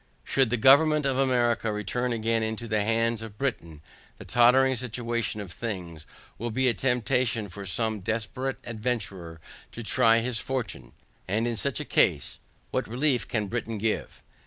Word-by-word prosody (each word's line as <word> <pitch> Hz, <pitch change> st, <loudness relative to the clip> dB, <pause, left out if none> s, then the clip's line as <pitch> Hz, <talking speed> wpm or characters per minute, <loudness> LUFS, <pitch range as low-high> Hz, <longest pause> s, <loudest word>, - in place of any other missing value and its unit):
Should 135 Hz, -3 st, +2 dB
the 125 Hz, -, +1 dB
government 150 Hz, +5 st, +5 dB
of 135 Hz, -1 st, +1 dB
America 120 Hz, -4 st, +2 dB
return 115 Hz, +4 st, -2 dB
again 115 Hz, 0 st, 0 dB
into 110 Hz, +1 st, -3 dB
the 110 Hz, -1 st, +1 dB
hands 115 Hz, +1 st, +1 dB
of 110 Hz, -2 st, -9 dB
Britain, 85 Hz, -, -3 dB, 0.3 s
the -, -, -11 dB
tottering 130 Hz, +2 st, +4 dB
situation 120 Hz, -2 st, -3 dB
of 100 Hz, -4 st, -7 dB
things, 90 Hz, -8 st, -6 dB, 0.3 s
will 120 Hz, +2 st, -2 dB
be 130 Hz, +3 st, +1 dB
a 120 Hz, -, +3 dB
temptation 125 Hz, -4 st, 0 dB
for 100 Hz, +1 st, -8 dB
some 110 Hz, +2 st, -1 dB
desperate 115 Hz, +6 st, -3 dB
adventurer 105 Hz, -8 st, -4 dB, 0.3 s
to 120 Hz, -, -7 dB
try 115 Hz, 0 st, +4 dB
his 115 Hz, 0 st, -1 dB
fortune; 125 Hz, -8 st, -4 dB, 0.3 s
and 105 Hz, +5 st, 0 dB
in 120 Hz, -, -1 dB
such 130 Hz, +1 st, -1 dB
a -, -, -4 dB
case, -, -, +1 dB, 0.3 s
what -, -, -1 dB
relief 125 Hz, +1 st, 0 dB
can 105 Hz, -3 st, -1 dB
Britain 115 Hz, +1 st, -3 dB
give? 110 Hz, +1 st, -3 dB
115 Hz, 160 wpm, -27 LUFS, 110-125 Hz, 0.3 s, government